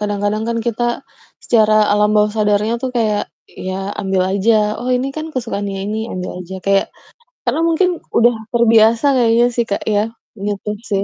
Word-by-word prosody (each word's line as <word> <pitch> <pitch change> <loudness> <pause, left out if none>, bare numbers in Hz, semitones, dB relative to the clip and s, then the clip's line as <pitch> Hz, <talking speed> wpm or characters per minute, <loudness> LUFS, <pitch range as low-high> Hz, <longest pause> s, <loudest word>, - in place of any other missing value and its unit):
Kadang-kadang 205 +1 -1
kan 230 - -1
kita 240 +1 -1 0.4
secara 215 -2 +3 0.2
alam 210 0 +3
bawah 210 0 +3
sadarnya 210 +1 +1
tuh 260 - -1
kayak 215 -3 +1 0.4
ya 195 +2 -3
ambil 190 -1 0
aja. 200 +4 +2 0.3
"Oh 245 - -4
ini 255 +2 -2
kan 310 0 -4
kesukaannya 205 -5 -3
ini," 215 +2 -3
ambil 180 0 -4
aja, 180 +1 -8
kayak 195 0 +2 0.6
karena 325 - 0
mungkin 350 +3 +2 0.3
udah 240 +1 +5 0.2
terbiasa 230 +1 +4
kayaknya 235 -1 +4
sih 235 -1 +1
Kak 200 - -2
ya. 205 - +3 0.5
Gitu 205 0 -3 0.2
sih. 200 -1 +1
215 Hz, 165 wpm, -17 LUFS, 205-235 Hz, 0.6 s, udah